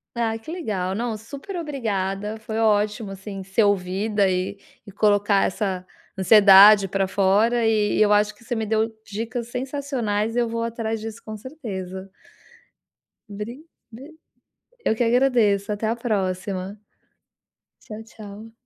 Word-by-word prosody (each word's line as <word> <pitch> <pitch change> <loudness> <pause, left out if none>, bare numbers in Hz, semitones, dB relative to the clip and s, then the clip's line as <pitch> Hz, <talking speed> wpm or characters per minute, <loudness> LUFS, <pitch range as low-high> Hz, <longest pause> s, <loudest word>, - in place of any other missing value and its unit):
Ah, 225 -1 -1
que 225 - -9
legal, 200 - -3
não 230 +1 -2
super 275 - -9
obrigada, 215 - -3
foi 220 0 -5
ótimo, 210 -1 +1
assim, 195 0 -7
ser 195 +4 +1
ouvida 200 +1 +1
e 185 +2 -2 0.3
e 200 - -11
colocar 205 0 +2
essa 185 -2 -2 0.3
ansiedade 200 0 +8
pra 195 +1 0
fora, 205 +5 +2
e 215 -2 +2
eu 210 -1 +4
acho 210 0 +3
que 230 - -21
você 240 +1 -3
me 220 -1 -2
deu 220 +1 0
dicas 225 +3 -5
sensacionais 250 -5 -2
e - - +2
eu 235 -1 0
vou 230 0 -2
atrás 225 -1 -3
disso, 225 0 -8
com 215 -1 -7
certeza. 195 - -7 1.2
Bri 215 +8 -7 0.3
b 275 +8 -12 0.7
eu - - +2
que 225 - -1
agradeço 230 -5 +2
até 210 +2 -3
a 230 - 0
próxima. 195 -3 -3 1.1
Tchau, 215 0 -8
tchau. 215 0 -11
215 Hz, 140 wpm, -23 LUFS, 200-230 Hz, 1.2 s, ansiedade